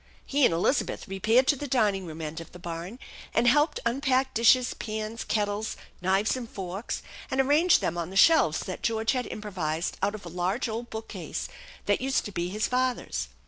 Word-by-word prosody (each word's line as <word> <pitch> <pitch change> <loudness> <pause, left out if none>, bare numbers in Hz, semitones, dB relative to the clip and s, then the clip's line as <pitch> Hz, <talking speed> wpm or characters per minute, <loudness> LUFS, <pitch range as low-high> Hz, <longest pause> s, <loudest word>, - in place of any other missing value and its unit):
He 285 -1 +3
and - - +4
Elizabeth 170 - 0
repaired 220 +7 +3
to 290 - +5
the 285 +2 -5
dining 205 -8 +1
room 160 0 -7
end 160 +2 -5
of 165 - -12
the - - -9
barn, 175 +5 -6 0.4
and 235 +1 +3
helped 295 +6 +4
unpack 260 +1 +1
dishes, 245 +2 +4
pana^ 215 +1 -5
kettles, 210 0 -1 0.2
knives, 195 +5 +2
and 245 -3 -6
forks, 195 +3 -5 0.3
and 265 - -1
arrange 295 +6 +4
them 175 +1 -1
on 170 0 -3
the 190 - -9
shelves 200 - +5
that 185 - -6
George 225 0 +1
had 255 -2 -1
improvised 175 -6 -3
out 205 +2 +1
of 200 - -10
a - - -6
large 180 +8 -1
old 230 +2 -4
bookcase 220 0 -5 0.4
that - - +2
used 265 +1 0
to 205 - -5
be 175 -2 -2
hia 210 +3 -5
father's. 255 +2 0
220 Hz, 190 wpm, -27 LUFS, 185-255 Hz, 0.4 s, to